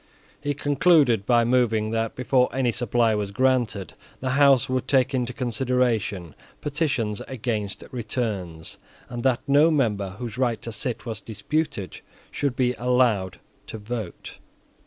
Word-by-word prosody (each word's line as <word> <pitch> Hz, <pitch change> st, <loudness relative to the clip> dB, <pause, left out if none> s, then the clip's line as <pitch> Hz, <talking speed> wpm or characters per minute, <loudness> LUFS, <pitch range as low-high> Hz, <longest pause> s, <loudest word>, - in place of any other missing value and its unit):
He 145 Hz, -1 st, -2 dB
concluded 145 Hz, -, +3 dB
by 120 Hz, -1 st, +4 dB
moving 115 Hz, -3 st, +2 dB
that, 115 Hz, 0 st, -1 dB
before 125 Hz, 0 st, +2 dB
any 130 Hz, -2 st, +1 dB
supply 115 Hz, -1 st, +1 dB
was 105 Hz, -2 st, -1 dB
granted, 120 Hz, -3 st, 0 dB, 0.3 s
the 130 Hz, 0 st, -2 dB
House 135 Hz, -1 st, +5 dB
would 130 Hz, -1 st, -1 dB
take 130 Hz, 0 st, +2 dB
into 125 Hz, -2 st, -1 dB
consideration 120 Hz, -, -1 dB, 0.3 s
petitions 140 Hz, -9 st, -1 dB
against 110 Hz, -5 st, -3 dB
returns, 105 Hz, -, -4 dB, 0.3 s
and 120 Hz, -1 st, -5 dB
that 130 Hz, -1 st, +2 dB
no 145 Hz, +3 st, +5 dB
member 105 Hz, -, 0 dB
whose 120 Hz, 0 st, -6 dB
right 120 Hz, -4 st, +1 dB
to 115 Hz, -, -5 dB
sit 115 Hz, +3 st, -4 dB
was 110 Hz, -3 st, -5 dB
disputed 110 Hz, -, -3 dB, 0.3 s
should 140 Hz, -3 st, -1 dB
be 125 Hz, -1 st, +1 dB
allowed 120 Hz, -7 st, +1 dB, 0.3 s
to -, -, -6 dB
vote. 110 Hz, -3 st, -6 dB
120 Hz, 135 wpm, -24 LUFS, 110-130 Hz, 0.3 s, House